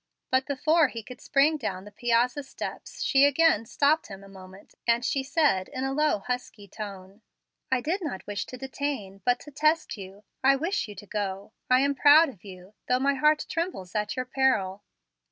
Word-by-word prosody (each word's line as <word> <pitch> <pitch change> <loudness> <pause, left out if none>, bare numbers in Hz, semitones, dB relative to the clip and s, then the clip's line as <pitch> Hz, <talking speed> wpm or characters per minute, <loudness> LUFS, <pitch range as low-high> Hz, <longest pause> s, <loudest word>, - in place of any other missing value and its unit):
But 260 +1 +2
before 310 +3 +3
he 230 -3 -7
could 250 +3 -11
spring 295 +3 +3
down 195 -8 -4
the 205 - -11
piazza, 240 +5 +1
steps 270 - -7
she 275 0 +4
again 285 -5 +4
stopped 295 +6 +2
him 195 -1 -10
a - - -13
moment, 190 0 -14
as 235 +1 +2
she 275 - 0
said, 270 - +1
in 255 - -4
a 270 0 -1
low, 300 -7 +1
husky 245 -3 -5
tone: 200 0 -9 0.5
"I 260 -1 +2
did 350 +9 -1
not 280 - -5
wish 205 -1 -4
to 255 - -8
detain, 265 -7 -4
but 245 0 +2
to 295 - -12
test 305 -1 +1
you. 195 +1 -11 0.2
I 270 +1 +6
wish 330 - -1
you 210 - -9
to 205 - -11
go. 200 0 -4 0.2
I 255 +1 +5
am 280 +1 +2
proud 295 +3 +6
of 200 -10 -14
you, 185 0 -12
though 250 - +3
my 275 +2 +2
heart 300 +2 +2
trembles 330 - -4
at 210 -1 -2
your 255 -1 -2
peril. 215 -8 +1
250 Hz, 195 wpm, -27 LUFS, 200-285 Hz, 0.5 s, I